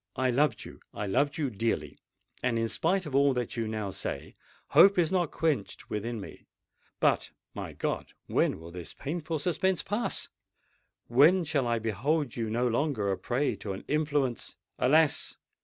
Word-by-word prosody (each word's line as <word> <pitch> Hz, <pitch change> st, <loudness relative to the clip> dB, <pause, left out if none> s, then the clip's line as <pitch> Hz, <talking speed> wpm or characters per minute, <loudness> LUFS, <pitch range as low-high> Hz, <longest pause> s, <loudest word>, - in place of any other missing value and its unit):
"I 130 Hz, 0 st, +1 dB
loved 130 Hz, -2 st, +1 dB
you—I 105 Hz, -, -8 dB
love 140 Hz, +9 st, +1 dB
you 145 Hz, -5 st, -1 dB
dearly; 100 Hz, -9 st, -2 dB, 0.4 s
and 120 Hz, -2 st, +1 dB
in 115 Hz, 0 st, 0 dB
spite 185 Hz, +7 st, +1 dB
of 150 Hz, -, -6 dB
all 140 Hz, -1 st, +4 dB
that 125 Hz, -2 st, -2 dB
you 115 Hz, -2 st, -1 dB
now 110 Hz, -2 st, -3 dB
say, -, -, -5 dB, 0.3 s
hope 200 Hz, 0 st, +7 dB
is 170 Hz, -2 st, +3 dB
not 180 Hz, -4 st, +2 dB
quenched 150 Hz, -11 st, -2 dB
within 115 Hz, +2 st, -3 dB
me. 100 Hz, -, -10 dB, 0.5 s
But, -, -, +2 dB, 0.2 s
my -, -, -6 dB
God! -, -, -3 dB
when -, -, +1 dB
will 85 Hz, +1 st, -10 dB
this 90 Hz, -1 st, -7 dB
painful 160 Hz, +2 st, -3 dB
suspense 180 Hz, +4 st, 0 dB
pass? 210 Hz, +4 st, -1 dB, 0.8 s
When 155 Hz, +10 st, +5 dB
shall 145 Hz, -5 st, 0 dB
I 120 Hz, 0 st, +1 dB
behold 120 Hz, -, -1 dB
you 115 Hz, -2 st, -2 dB
no 120 Hz, +3 st, +1 dB
longer 120 Hz, -5 st, 0 dB
a 95 Hz, -, -1 dB
prey 130 Hz, +4 st, 0 dB
to 100 Hz, -, -5 dB
an 95 Hz, -, -7 dB
influence——" 145 Hz, -5 st, 0 dB, 0.2 s
"Alas! 150 Hz, +3 st, +3 dB
130 Hz, 165 wpm, -29 LUFS, 115-155 Hz, 0.8 s, hope